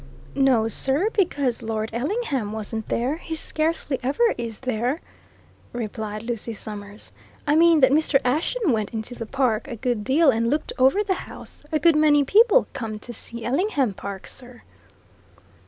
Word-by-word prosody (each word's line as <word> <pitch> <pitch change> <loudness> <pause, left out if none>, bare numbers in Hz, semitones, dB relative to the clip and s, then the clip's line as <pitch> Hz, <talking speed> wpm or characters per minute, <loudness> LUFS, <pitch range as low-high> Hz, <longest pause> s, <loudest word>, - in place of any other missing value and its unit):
"No, 260 -5 +3
sir, 275 - 0
because 285 - 0
Lord 220 -1 -3
Ellingham 270 - -2
wasn't 220 0 -5
there 260 +6 -1
he 325 -1 -6
scarcely 310 -3 -2
ever 365 - +2
is 230 -3 -6
there," 255 +3 -1 0.7
replied 215 -2 -4
Lucy 230 -1 -4
Summers. 205 0 -8 0.3
"I 295 - +2
mean 330 -1 +5
that 260 - +6
Mr. 300 -1 +3
Ashton 320 - +1
went 220 -1 -1
into 220 +2 -4
the 230 -2 -6
park 250 -3 0
a 250 - -5
good 235 -2 -2
deal 280 +5 +4
and 230 0 0
looked 295 +3 -1
over 270 +11 +4
the 395 -2 +1 0.2
house - - -11
a 310 - +2
good 330 +1 +4
many 300 -1 +5
people 450 - +5
come 225 -5 -4
to 240 +3 -9
see 235 +1 -7
Ellingham 275 - +1
Park, 195 0 -7
sir." 245 -2 -10
255 Hz, 160 wpm, -24 LUFS, 225-305 Hz, 0.7 s, that